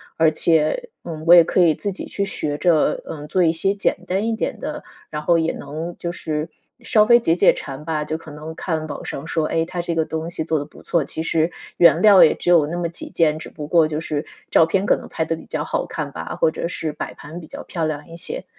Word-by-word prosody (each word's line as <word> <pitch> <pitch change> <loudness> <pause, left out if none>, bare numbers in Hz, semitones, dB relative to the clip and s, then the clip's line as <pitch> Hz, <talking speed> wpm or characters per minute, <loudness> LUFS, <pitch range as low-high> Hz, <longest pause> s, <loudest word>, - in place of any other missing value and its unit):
而 160 -1 +4
且， 160 - +1
嗯， 160 -2 -7
我 175 - +9
也 170 - +9
可 175 - 0
以 165 -3 +5
自 200 - -3
己 190 - -7
去 200 - -3
学 150 -6 -3
着， 165 -2 +2
嗯， 150 -1 -7
做 185 +4 +2
一 165 - +4
些 195 +4 +1
简 200 - 0
单 190 +4 0
一 230 - 0
点 220 - -2
的， - - -4 0.3
然 150 - -4
后 170 -1 +4
也 165 0 +1
能 160 +4 -6
就 170 - -3
是 155 -2 -3 0.4
稍 215 -2 +5
微 235 +2 +6
解 165 -8 +2
解 - - +6
馋 135 +2 -7
吧， 155 -1 -2
就 155 +1 -3
可 160 -1 -12
能 155 +2 -8
看 160 -3 -3
网 145 - -6
上 140 - -6
说， 160 -2 0
哎， 165 0 0
它 175 +1 -4
这 170 0 -3
个 160 -1 +1
东 160 +1 -4
西 170 - -4
做 160 -1 +1
的 145 - -2
不 145 - -15
错， 170 -3 +1
其 150 +3 -4
实 165 +1 +1 0.2
原 170 -1 +5
料 200 -2 +8
也 - - +6
只 - - -3
有 170 -4 +6
那 170 +3 -4
么 175 -1 -1
几 170 - -6
件， 155 -2 +2
只 - - -8
不 150 -1 -8
过 165 0 +4
就 155 0 -2
是 150 -1 -3 0.2
照 165 - +5
片 195 +4 0
可 - - +4
能 - - -10
拍 160 - -2
得 165 0 -1
比 - - -12
较 - - -3
好 - - -1
看 - - -4
吧， - - -6
或 - - +4
者 160 - -4
是 160 -3 -3
摆 - - -6
盘 160 +4 -10
比 - - -10
较 - - -9
漂 165 -3 -3
亮 150 -1 -4
一 165 - -11
些。 470 - -3
165 Hz, 285 characters per minute, -21 LUFS, 155-175 Hz, 0.4 s, 我